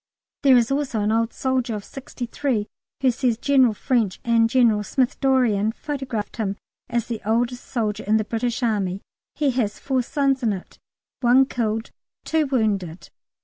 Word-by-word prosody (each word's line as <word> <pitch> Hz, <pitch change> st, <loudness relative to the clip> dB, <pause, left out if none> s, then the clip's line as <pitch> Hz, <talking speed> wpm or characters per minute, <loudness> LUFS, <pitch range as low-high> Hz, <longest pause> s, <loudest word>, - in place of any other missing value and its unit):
There 265 Hz, -3 st, +6 dB
is 235 Hz, +1 st, +2 dB
also 275 Hz, -6 st, 0 dB
an 210 Hz, +1 st, +1 dB
old 225 Hz, +1 st, +1 dB
soldier 260 Hz, -3 st, -1 dB
of 205 Hz, -, -6 dB
sixty 260 Hz, -2 st, -7 dB
three 235 Hz, -3 st, -1 dB, 0.4 s
who 260 Hz, -1 st, +4 dB
says 245 Hz, -2 st, 0 dB
General 260 Hz, -4 st, +3 dB
French 225 Hz, -5 st, 0 dB
and 230 Hz, -1 st, +3 dB
General 230 Hz, -4 st, +3 dB
Smith 250 Hz, +4 st, 0 dB
Dorrien 240 Hz, -6 st, +2 dB
photographed 260 Hz, -5 st, -5 dB
him 200 Hz, -3 st, -1 dB, 0.3 s
as 235 Hz, -1 st, 0 dB
the 230 Hz, -3 st, -5 dB
oldest 240 Hz, +3 st, 0 dB
soldier 215 Hz, -4 st, -2 dB
in 215 Hz, +2 st, +3 dB
the 215 Hz, -, 0 dB
British 235 Hz, +3 st, -2 dB
Army. 200 Hz, -4 st, -1 dB, 0.3 s
He 290 Hz, -3 st, +1 dB
has 230 Hz, -5 st, -1 dB
four 265 Hz, -2 st, 0 dB
sons 275 Hz, +1 st, 0 dB
in 225 Hz, -4 st, +1 dB
it, 185 Hz, -, -9 dB, 0.4 s
one 255 Hz, +2 st, +5 dB
killed, 225 Hz, -3 st, -2 dB, 0.3 s
two 315 Hz, -2 st, +1 dB
wounded. 200 Hz, -, -1 dB
235 Hz, 165 wpm, -23 LUFS, 215-260 Hz, 0.4 s, There